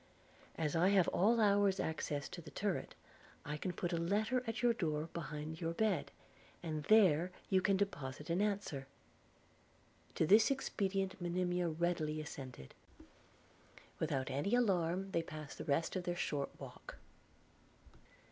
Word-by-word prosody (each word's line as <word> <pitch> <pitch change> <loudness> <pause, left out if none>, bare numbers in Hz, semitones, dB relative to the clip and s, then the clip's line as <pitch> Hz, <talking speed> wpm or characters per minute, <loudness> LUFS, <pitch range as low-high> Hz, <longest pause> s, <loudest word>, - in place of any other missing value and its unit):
As 155 -2 -1
I 175 +3 +4
have 195 -4 +4
at - - -9
all 225 +5 +4
hours 200 -2 +4
access 150 -2 -2
to 175 - -7
the 155 - -11
turret, 200 +2 -2 0.5
I 150 - -3
can 180 +5 -3
put 175 0 -3
a - - +1
letter 210 +9 +1
at 225 +2 -3
your 240 -1 +5
door 160 -6 -2
behind 155 0 -5
your 165 0 -1
bed; 210 -6 +1 0.5
and 155 -3 -3
there 185 -5 +5 0.2
you 190 -1 +5
can 195 0 +3
deposit 150 -5 -3
an 175 +4 +2
answer.' 200 -10 -1 1.3
To - - +2
this 210 - +6
expedient 195 -8 -1
Monimia 175 0 0
readily 160 -2 -1
assented. 130 - -8 1.3
Without 140 -4 -1
any 145 - +1
alarm 190 -4 +1
they 170 - +1
passed 155 -3 -8
the 155 - -5
rest 160 +4 0
of 185 -1 -2
their 175 - -1
short 145 -5 -1
walk. - - -10
175 Hz, 145 wpm, -36 LUFS, 155-195 Hz, 1.3 s, this